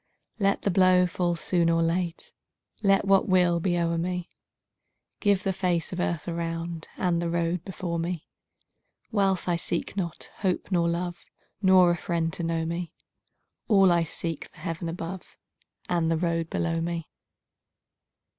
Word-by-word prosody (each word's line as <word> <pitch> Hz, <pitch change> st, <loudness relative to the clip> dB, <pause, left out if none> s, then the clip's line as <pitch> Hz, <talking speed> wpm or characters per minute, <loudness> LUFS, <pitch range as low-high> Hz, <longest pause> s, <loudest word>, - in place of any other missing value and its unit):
Let 200 Hz, -1 st, +2 dB
the 200 Hz, -, +2 dB
blow 185 Hz, 0 st, +5 dB
fall 175 Hz, -1 st, 0 dB
soon 170 Hz, 0 st, +1 dB
or 165 Hz, 0 st, +3 dB
late, 170 Hz, 0 st, -2 dB, 0.5 s
Let 195 Hz, -1 st, +3 dB
what 195 Hz, 0 st, +4 dB
will 180 Hz, -2 st, +4 dB
be 175 Hz, 0 st, 0 dB
o'er 170 Hz, -1 st, +1 dB
me; 180 Hz, 0 st, -2 dB, 0.9 s
Give 200 Hz, -3 st, +2 dB
the 195 Hz, -, 0 dB
face 180 Hz, -3 st, 0 dB
of 180 Hz, -, -4 dB
earth 170 Hz, -3 st, -1 dB
around 165 Hz, -1 st, -3 dB
And 175 Hz, -2 st, +1 dB
the 170 Hz, -, -1 dB
road 170 Hz, 0 st, 0 dB
before 175 Hz, -3 st, -4 dB
me. 170 Hz, -1 st, -3 dB, 0.9 s
Wealth 195 Hz, -4 st, +1 dB
I 175 Hz, -1 st, +2 dB
seek 170 Hz, +2 st, -2 dB
not, 170 Hz, -5 st, -4 dB
hope 190 Hz, 0 st, -1 dB
nor 170 Hz, -2 st, +2 dB
love, 175 Hz, +1 st, -3 dB, 0.4 s
Nor 185 Hz, -2 st, +6 dB
a 175 Hz, -, 0 dB
friend 165 Hz, -2 st, -1 dB
to -, -, -4 dB
know 165 Hz, -1 st, -1 dB
me; 170 Hz, 0 st, -4 dB, 0.7 s
All 195 Hz, -4 st, +6 dB
I 170 Hz, 0 st, +4 dB
seek, 165 Hz, -1 st, -4 dB
the -, -, -21 dB
heaven 165 Hz, -1 st, -3 dB
above 170 Hz, +2 st, -7 dB, 0.5 s
And 170 Hz, -2 st, +1 dB
the 165 Hz, -, +2 dB
road 165 Hz, -1 st, -1 dB
below 165 Hz, -1 st, -1 dB
me. 170 Hz, -1 st, -3 dB
175 Hz, 155 wpm, -27 LUFS, 165-185 Hz, 0.9 s, Nor